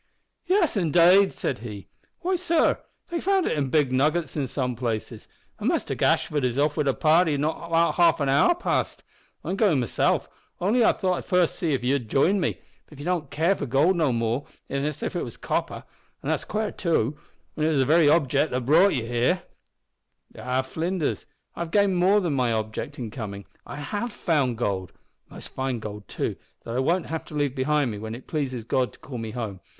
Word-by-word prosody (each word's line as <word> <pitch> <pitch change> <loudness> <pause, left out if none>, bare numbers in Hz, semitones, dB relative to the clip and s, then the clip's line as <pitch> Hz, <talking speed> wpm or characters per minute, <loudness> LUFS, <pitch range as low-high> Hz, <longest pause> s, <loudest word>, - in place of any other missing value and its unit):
"Yes, 370 -6 +2
indade," 180 +2 +5
said - - -3
he. 105 -4 -8 0.3
"Why, 370 +2 0
sor, 340 -2 +2 0.3
they've 340 - -2
found 390 -1 +2
it - - 0
in 140 -3 -1
big 145 -2 +2
nuggets 150 +3 +1
in 140 -4 -1
some 125 -1 -2
places, 115 -2 -4 0.3
an' - - -2
Muster - - 0
Gashford 145 -3 +1
is 125 0 0
off 145 +1 +2
wid 150 -3 0
a 135 - +3
party 160 -1 +3
not 160 +3 -2 0.3
half 170 -2 +4
an 140 - 0
hour 140 - +4
past. 355 - -2 0.4
I'm - - -2
goin' 195 -11 +3
mesilf, 120 - +1 0.3
only 220 +7 +2
I - - +6
thought 185 -2 -1
I'd - - -7
see - - -22
first 180 -3 +2
if 145 -8 0
ye 125 +2 +2
wouldn't 125 -6 -2
jine 180 - +3
me; 175 - -1 0.3
but 150 - -14
ye 145 - -8
don't 175 -3 0
seem - - -25
to 145 - -11
care 170 +5 +3
for 145 - -4
goold 145 +9 +3
no 160 -6 +2
more 115 +3 -1 0.2
nor 140 +1 -1
if 150 - -5
it - - -1
was - - -7
copper; - - -2 0.4
an - - -3
that's - - -1
quare, 215 0 -2
too, 155 - 0 0.4
whin 155 -1 0
it - - +3
was 155 - +1
the 135 - +3
very 155 +1 +5
objec' 145 -1 +3
that 125 -1 -2
brought 165 +7 +5
ye 120 -4 -2
here." 120 +10 +1 0.9
"Ah, 130 +1 -1
Flinders, 160 +4 -2 0.3
I - - -10
have 170 -1 -3
gained 200 +1 +3
more 190 +4 +4
than 170 -5 -1
my 125 -3 +1
object 110 +6 -3
in 115 -4 -5
coming. 100 -4 -6 0.2
I - - -7
have 205 +11 -4
found 145 - 0
gold 95 -6 -2 0.4
most - - -10
fine 130 -2 -2
gold, 105 -2 -8
too, - - -3 0.3
that 115 - -5
I - - +1
won't 170 +6 +1
have 160 0 -4
to 150 - -10
leave 145 -3 0
behind 140 -1 +1
me 105 - -6
when 110 +1 -5
it 125 - -11
pleases 130 -6 -3
God 125 +2 0
to - - -17
call 125 -4 -7
me 115 -1 -5
home. 110 -5 -5
145 Hz, 215 wpm, -25 LUFS, 125-175 Hz, 0.9 s, I